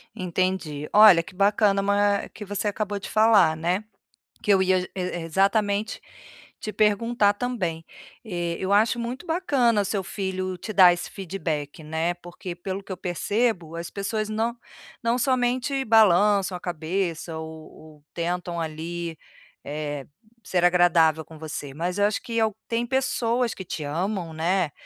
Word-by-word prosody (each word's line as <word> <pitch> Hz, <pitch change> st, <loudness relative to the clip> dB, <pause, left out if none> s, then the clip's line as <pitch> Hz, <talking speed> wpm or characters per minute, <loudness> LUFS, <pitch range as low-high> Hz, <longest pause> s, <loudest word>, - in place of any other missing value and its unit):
Entendi. 180 Hz, -5 st, -2 dB
Olha, 205 Hz, -5 st, +8 dB
que 180 Hz, -, -14 dB
bacana 200 Hz, 0 st, +3 dB
ma 200 Hz, 0 st, +2 dB
que 210 Hz, -, -8 dB
você 205 Hz, +1 st, -3 dB
acabou 205 Hz, 0 st, -2 dB
de -, -, -8 dB
falar, 210 Hz, -7 st, +5 dB
né. 175 Hz, +6 st, -1 dB, 0.6 s
Que 205 Hz, -, +4 dB
eu 190 Hz, -, +4 dB
ia 185 Hz, 0 st, +3 dB
e 180 Hz, -, -5 dB
e 185 Hz, -, -2 dB, 0.2 s
exatamente 200 Hz, +4 st, +1 dB, 0.6 s
te 215 Hz, -, -5 dB
perguntar 210 Hz, 0 st, +2 dB
também. 190 Hz, -9 st, -3 dB, 0.4 s
Eh, 175 Hz, -4 st, -3 dB
eu 190 Hz, +1 st, 0 dB
acho 220 Hz, +3 st, +3 dB
muito 250 Hz, +7 st, -5 dB
bacana 270 Hz, -, +2 dB
o -, -, -2 dB
seu 200 Hz, -1 st, -1 dB
filho 185 Hz, -1 st, -3 dB
te 215 Hz, +4 st, -6 dB
dar 185 Hz, -2 st, +8 dB
esse 175 Hz, -, -5 dB
feedback, 160 Hz, -6 st, -4 dB
né, 160 Hz, +3 st, -1 dB
porque 175 Hz, 0 st, -8 dB
pelo 190 Hz, +2 st, -5 dB
que 195 Hz, -, -10 dB
eu 185 Hz, -, -4 dB
percebo, 180 Hz, -1 st, -1 dB
as 170 Hz, 0 st, -5 dB
pessoas 215 Hz, +2 st, -3 dB
não 230 Hz, +2 st, -1 dB, 0.5 s
não 230 Hz, +1 st, +2 dB
somente 255 Hz, +2 st, +1 dB
balançam 205 Hz, -3 st, +4 dB
a -, -, -13 dB
cabeça 170 Hz, -1 st, -3 dB
ou 160 Hz, 0 st, -8 dB
ou 155 Hz, -2 st, -16 dB
tentam, 175 Hz, 0 st, -3 dB
ali, 165 Hz, +1 st, -4 dB, 0.5 s
eh, 145 Hz, -1 st, -4 dB, 0.4 s
ser 180 Hz, -3 st, 0 dB
agradável 165 Hz, -3 st, +4 dB
com 160 Hz, -, -13 dB
você, 150 Hz, -3 st, -6 dB
mas 175 Hz, +6 st, -3 dB
eu 205 Hz, -, +4 dB
acho 210 Hz, -, -2 dB
que 230 Hz, -1 st, -2 dB
é 220 Hz, -, +4 dB
o 215 Hz, -2 st, -3 dB
tem 235 Hz, +1 st, -1 dB
pessoas 245 Hz, -2 st, 0 dB
que 190 Hz, -, -8 dB
te 155 Hz, -, -5 dB
amam, 170 Hz, +3 st, -2 dB
né, 170 Hz, 0 st, 0 dB
190 Hz, 160 wpm, -25 LUFS, 170-215 Hz, 0.6 s, Olha